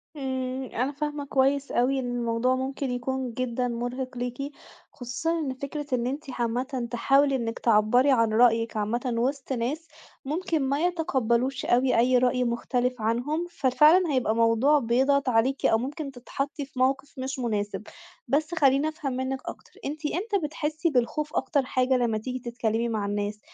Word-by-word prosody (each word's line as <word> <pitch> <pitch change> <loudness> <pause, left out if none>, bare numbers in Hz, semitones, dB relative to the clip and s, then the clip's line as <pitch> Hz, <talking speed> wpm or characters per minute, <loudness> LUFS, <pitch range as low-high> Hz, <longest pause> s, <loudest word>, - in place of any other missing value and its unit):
امم، 260 -2 -3
أنا 255 +4 0
فاهمة 295 0 -4
كويس 275 +1 +1
أوي 265 +2 +2
إن 245 -1 -3
الموضوع 240 +1 +1
ممكن 265 0 -3
يكون 250 0 -3
جدًا 250 0 -1
مُرهق 245 +2 -4
ليكِ، 245 +4 -4 0.4
خصوصًا 325 +7 -2
إن 270 -4 -2
فكرة 280 +2 -5
إن 240 0 -1
أنتِ 280 +4 -3
عامةً 250 +1 -2
تحاولي 275 +3 +3
إنكِ 230 -2 -3
تعبّري 235 +5 +4
عن 230 -4 +3
رأيكِ 230 -1 +3
عامةً 235 +4 -1
وسط 270 +2 -1
ناس 275 +8 -2 0.4
ممكن 320 +2 -1
ما 275 +1 0
يتقبلوش 265 -7 0
أوي 250 +1 +3
أي 250 +2 +4
رأي 250 0 +2
مُختلف 245 +1 -1
عنهم، 250 +10 -1
ففعلًا 305 +4 +4
هيبقى 245 -4 +1
موضوع 230 +6 +4
بيضغط 265 +3 +2
عليكِ 250 +4 +1
أو 225 - +5
ممكن 280 +4 -4
تتحطي 275 +3 -4
في 270 -1 -10
مَوقِف 270 +2 +1
مش 265 +1 -4
مُناسب. 210 -4 -2 0.4
بس 310 +4 0
خليني 280 -1 +3
أفهم 305 -4 -4
منكِ 260 +1 -2
أكتر، - - -9
أنتِ 300 +2 -5
امتى 400 +7 0
بتحسي 305 +2 -1
بالخوف 295 +3 -1
أكتر 280 -5 +1
حاجة 255 0 +2
لمّا 235 -3 +1
تيجي 255 +4 -4
تتكلمي 235 -1 -1
مع 215 -3 -1
الناس؟ 205 +1 -2
255 Hz, 160 wpm, -26 LUFS, 240-280 Hz, 0.4 s, أو